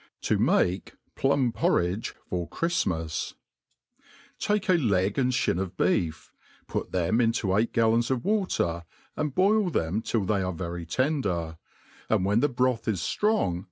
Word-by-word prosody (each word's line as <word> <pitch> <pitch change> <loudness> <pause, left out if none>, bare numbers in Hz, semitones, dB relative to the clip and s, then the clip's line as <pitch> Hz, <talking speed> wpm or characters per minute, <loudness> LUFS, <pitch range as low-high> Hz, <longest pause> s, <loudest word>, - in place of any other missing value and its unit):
To - - +1
make 90 +2 +1 0.2
Plum 135 -2 +2
Porridge 95 -1 0
for 90 -2 -3
Chrtjlmas. 90 - -1 1.0
TAKE 210 -1 0
a - - +6
leg 100 - +1
and 130 -1 +2
(bin 85 - +1
of 95 -1 -4
beef, 85 -4 0 0.3
put - - -4
them 95 +6 +1
into 115 -4 +1
eight 110 +3 +1
gallons 115 +1 +2
of 130 +1 -1
water, 180 - 0 0.3
and 150 -3 -2
boil 200 +1 +3
them 95 - -1
till 110 -3 -1
they 100 0 +1
are 90 0 -2
very 85 -1 -5
tender, 90 - -1 0.5
and 95 - +2
when 105 +3 +3
the 145 +4 +2
broth 125 -2 0
is 100 -7 0
ftrong 210 - +1
110 Hz, 150 wpm, -27 LUFS, 90-135 Hz, 1.0 s, a